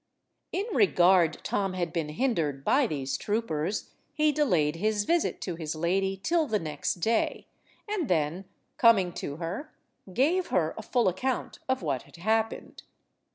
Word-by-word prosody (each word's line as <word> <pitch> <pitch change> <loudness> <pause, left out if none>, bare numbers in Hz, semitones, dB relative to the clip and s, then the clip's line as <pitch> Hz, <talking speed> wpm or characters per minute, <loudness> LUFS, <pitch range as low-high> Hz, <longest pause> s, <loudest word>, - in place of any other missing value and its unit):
In 395 - -1
regard 180 - +4
Tom 195 -2 -1
had 175 -3 -2
been 165 -4 -2
hindered 155 - -1
by 270 -1 +4
these 135 -6 -2
troopers, 205 -4 -2 0.2
he 305 0 +3
delayed 175 - +1
his 210 +2 +1
visit 340 +4 +1
to 180 - -3
his 160 -2 -4
lady 190 +4 0
till 330 -2 +2
the 220 - +1
next 150 -5 -2
day, 220 +6 0 0.4
and 410 -8 -1
then, 165 +2 0 0.3
coming 200 -7 +5
to 145 - -5
her, 180 - -5 0.4
gave 325 - +2
her 160 -3 +1
a - - -6
full 235 +1 +1
account 245 +8 -2
of 260 -7 0
what 140 -5 -1
had - - -17
happened. 220 +5 -1
190 Hz, 155 wpm, -28 LUFS, 165-245 Hz, 0.4 s, coming